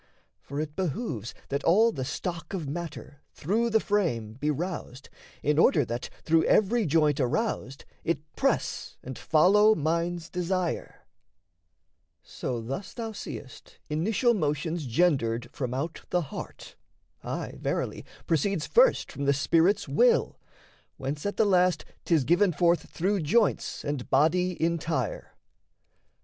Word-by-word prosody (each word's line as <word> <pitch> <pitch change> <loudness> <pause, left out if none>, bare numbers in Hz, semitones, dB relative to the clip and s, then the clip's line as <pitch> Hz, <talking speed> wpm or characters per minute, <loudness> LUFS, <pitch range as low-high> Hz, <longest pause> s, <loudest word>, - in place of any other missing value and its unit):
For 140 +1 -6
it 150 -1 -4
behooves 150 - -3
That 140 +1 -2
all 220 +7 +5
the 135 -8 -4
stock 170 +5 -4
of 165 -6 -4
matter, 150 -2 -6
through 220 +9 0
the 220 0 +3
frame, 160 - -1
Be 145 +6 -2
roused, 150 -4 -4 0.3
in 150 +1 +2
order 150 -4 +4
that, 120 +1 -4
through 165 0 +3
every 215 0 +3
joint, 150 -1 +3
Aroused, 135 - -1 0.2
it 165 -1 +1 0.2
press - - -1
and 130 0 -6
follow 205 - +4
mind's 170 +1 -1
desire; 180 -1 -3 1.2
So 125 -2 -4
thus 135 - -6
thou 225 -2 -4
seest 145 -9 -9
initial 215 +10 +2
motion's 155 - -1
gendered 120 -4 +1
From 125 -3 -3
out 145 +6 -3
the 180 - +1
heart, - - -8 0.5
aye, - - -5
verily, - - -2 0.2
proceeds 165 +1 0
First - - +3
from 140 - -4
the 140 - +4
spirit's 165 +7 +2
will, - - +3 0.6
whence 145 +6 -3
at 205 - -4
the 220 - +4
last 180 -4 +3 0.2
'Tis 160 -5 +3
given 175 +7 +3
forth 170 +2 +2
through 195 +4 0
joints 195 +5 +1
and 145 -4 -3
body 175 +6 +2
entire. 160 -7 -1
165 Hz, 135 wpm, -27 LUFS, 140-190 Hz, 1.2 s, all